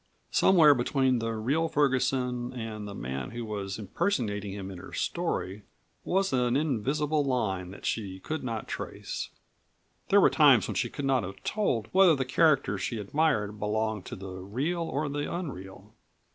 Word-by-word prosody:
Somewhere 165 -6 +6
between 130 0 +1
the 115 0 -2
real 140 +9 0
Ferguson 130 -4 +1
and 110 -3 -5
the 100 - -7
man 65 -1 -4
who 120 0 -5
was 100 -2 -4
impersonating 105 - -1
him 95 -1 -6
in 90 - -8
her 95 - -11
story 95 +3 -2 0.4
was 190 -1 +1
an 125 0 +2
invisible 150 +2 0
line 105 -9 -1
that 95 - -10
she 95 -4 -2
could 155 +10 -4
not 115 -3 -4
trace. - - -5 0.8
There - - +6
were - - +5
times - - +6
when - - -3
she - - -1
could 140 - -5
not 135 -2 +3
have 95 +1 -8
told 125 - 0
whether 185 -4 +6
the 135 -2 -1
character 135 - +3
she 115 - -2
admired 105 -2 0
belonged 110 -1 -1
to - - -6
the 95 -1 -8
real 135 - -2
or 150 -2 -2
the 145 +1 -3
unreal. 105 - -7
120 Hz, 165 wpm, -28 LUFS, 105-145 Hz, 0.8 s, Somewhere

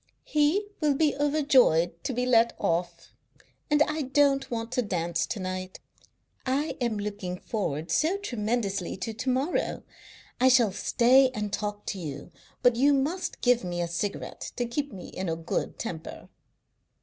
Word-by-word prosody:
He 305 +7 +2
will 295 -3 +2
be 300 +1 +2
overjoyed 270 - +3
to - - 0
be 250 0 -1
let 235 -2 +4
off. 170 +1 -2 0.6
And 295 0 +5
I 305 +1 -2
don't 275 0 +2
want 230 -1 -4
to 250 0 +1
dance 170 -5 -1
to 215 - -4
night. 185 0 -5 0.6
I 275 +4 -1
am 235 -3 0
looking 205 -3 -4
forward 160 -7 -3
so 325 - +2
tremendously 215 - -2
to 220 +4 -4
to 255 +4 -3
morrow. 265 +7 0 0.6
I 255 - +5
shall 240 -5 +5
stay 255 +6 +4
and 210 -1 -3
talk 210 0 -3
to 195 - -4
you, 145 -4 -7 0.3
but 245 -1 +5
you 280 +3 +5
must 345 +7 -2
give 245 -1 +3
me 175 -1 -3
a 175 - 0
cigarette 170 +4 -4
to 245 - -1
keep 285 +4 -3
me 185 -2 -9
in 185 -1 -4
a 165 - 0
good 165 0 -3
temper." 165 -8 -7
235 Hz, 160 wpm, -27 LUFS, 185-275 Hz, 0.6 s, And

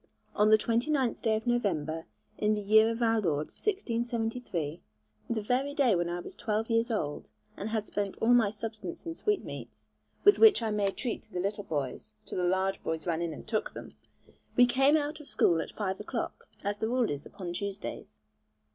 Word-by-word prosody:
On 210 +1 +4
the 215 - +8
29th 240 +3 0
day 220 -1 +2
of 220 - -3
November, 165 -10 0 0.3
in 215 0 +3
the 210 - -2
year 220 +2 +6
of 230 +1 -1
our 225 -1 +3
Lord 155 -5 0
1673, 230 - -2 0.5
the 230 -2 0
very 265 +6 0
day 265 -7 +4
when 175 -1 +1
I 175 +1 -2
was - - -9
twelve 220 +1 -2
years 230 +2 +2
old, 150 -10 -2 0.3
and 205 - -4
had 220 -1 -1
spent 200 -2 -3
all 235 +2 +4
my 235 -4 +5
substance 215 - -6
in 330 - -3
sweetmeats, 415 +4 -3 0.3
with 410 - +7
which 425 - +7
I 220 - 0
made 200 -2 0
treat 240 -4 -2
to - - -25
the 180 - -3
little 200 +2 -2
boys, 130 -7 -4
till - - -4
the 180 - +1
large 190 +2 +1
boys 160 0 -3
ran 170 -1 0
in 170 -1 -1
and 150 - -9
took 215 -1 -1
them, - - -8 0.6
we 245 - +8
came 270 +5 +4
out 300 +1 -2
of 300 - -12
school 165 -2 +3
at - - -6
five 190 -3 -3
o'clock, 225 +3 -4 0.2
as 205 +1 -2
the 220 - 0
rule 245 -5 +1
is 145 0 -5
upon 185 -4 -6
Tuesdays. 200 +2 -5
215 Hz, 200 wpm, -30 LUFS, 185-240 Hz, 0.6 s, the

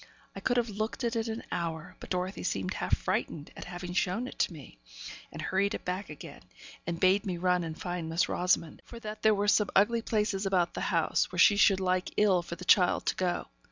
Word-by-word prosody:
I - - -5
could 245 - 0
have 240 -1 +1
looked 215 +4 -3
at 235 0 0
it 225 0 -1
an 225 +1 -4
hour, 170 0 -4
but - - -10
Dorothy 185 +1 -2
seemed 95 -1 -2
half - - 0
frightened 150 -2 -3
at - - -8
having 175 0 -6
shown 190 +7 0
it - - -11
to - - +2
me, 140 - -12 0.5
and - - -9
hurried 200 +2 0
it - - -8
back 185 +1 -3
again, 150 - -10 0.5
and 170 -1 -2
bade 190 +3 +4
me 185 -4 -3
run 180 0 +2
and 160 -1 -6
find 175 -2 -4
Miss 165 +2 +1
Rosamond, 180 -3 0
for 235 - -11
that 215 -1 -7
there 215 -1 +5
were 205 +1 0
some 210 0 +4
ugly 230 +4 +4
places 210 -3 0
about 180 -3 +1
the - - -4
house, - - +1
where - - -6
she 205 - +7
should 200 -1 +5
like 185 -1 -1
ill 195 -4 +4
for 170 0 -7
the 180 - -10
child 180 -1 +4
to - - +1
go. 180 -2 -1
185 Hz, 230 wpm, -30 LUFS, 175-210 Hz, 0.5 s, she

